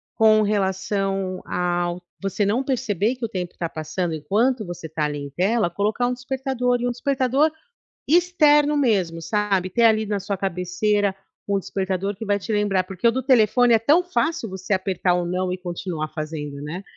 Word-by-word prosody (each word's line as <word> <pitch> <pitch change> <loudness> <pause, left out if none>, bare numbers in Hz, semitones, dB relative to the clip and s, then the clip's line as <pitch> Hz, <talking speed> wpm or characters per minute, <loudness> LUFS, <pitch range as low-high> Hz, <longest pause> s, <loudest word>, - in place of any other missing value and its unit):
com 215 -1 +5
relação 195 -1 -1
ao 175 0 -1 0.2
você 195 +1 0
não 225 +7 +1
perceber 240 -4 0
que 250 -2 -4
o - - -5
tempo 180 -4 -4
está 170 - -3
passando 160 +2 -3
enquanto 215 - +1
você 175 -1 -7
está 155 -1 -2
ali 150 0 -3
em 140 0 -6
tela, 190 +5 +1
colocar 210 +6 0
um 250 - 0
despertador, 250 -1 -1
e 240 - -2
um - - 0
despertador 270 +4 +1 0.6
externo 300 -3 +4
mesmo, 190 -11 +1
sabe? 195 +1 0
Ter 235 +6 +1
ali 220 -1 +4
na 205 -1 -1
sua 200 +1 -3
cabeceira 195 +2 0 0.3
um 200 -1 +1
despertador 195 +1 -2
que 220 +3 -7
vai 205 -1 +2
te 210 - -5
lembrar, 205 -3 +1
porque 185 +4 -1
o - - +5
do 260 +2 -2
telefone 245 -1 +4
é 225 - +5
tão 300 +10 +4
fácil 335 - -1
você 190 +2 -3
apertar 185 -1 +1
o 175 -1 -1
não 180 +1 -1
e - - -4
continuar 175 -3 -4
fazendo, 150 -2 -5
né? 165 +6 -6
200 Hz, 185 wpm, -23 LUFS, 180-240 Hz, 0.6 s, com